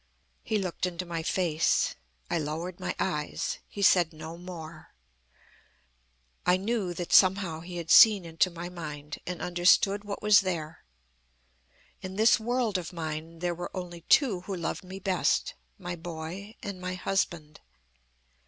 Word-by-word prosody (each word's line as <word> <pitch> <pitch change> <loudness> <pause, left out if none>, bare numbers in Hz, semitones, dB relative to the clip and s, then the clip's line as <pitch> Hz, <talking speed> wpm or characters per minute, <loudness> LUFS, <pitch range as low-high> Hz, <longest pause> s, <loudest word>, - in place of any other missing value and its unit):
"He 220 - -1
looked 185 -2 -2
into 180 0 -5
my 170 -1 -3
face. 165 -2 +1 0.3
I - - 0
lowered 160 +4 -4
my - - -3
eyes. 150 -6 -2
He 200 - -5
said 175 -3 +5
no 160 +1 -8
more. 170 - -10 1.5
I 180 +1 +4
knew 195 -3 -2
that, 175 0 -4
somehow, 185 -4 +5
he 175 +1 -8
had 165 -1 -4
seen 210 -5 +8
into 165 +2 +1
my 170 0 -7
mind, 150 -4 -7
and 180 -1 -4
understood 180 +3 +3
what 205 0 -6
was 210 -2 +7
there. 170 -5 -4 1.2
In 190 0 -6
this 220 +3 +5
world 230 -3 0
of 175 - -7
mine, 160 -1 -5
there 175 -1 0
were 175 +1 -6
only 175 -2 -6
two 240 -11 +4
who 195 +1 -5
loved 170 +1 -3
me 185 +1 -8
best 185 -2 0 0.2
my 175 -2 -5
boy 175 +5 -7
and 200 -3 -6
my 185 0 -3
husband. 170 -5 -2
180 Hz, 150 wpm, -28 LUFS, 165-190 Hz, 1.5 s, seen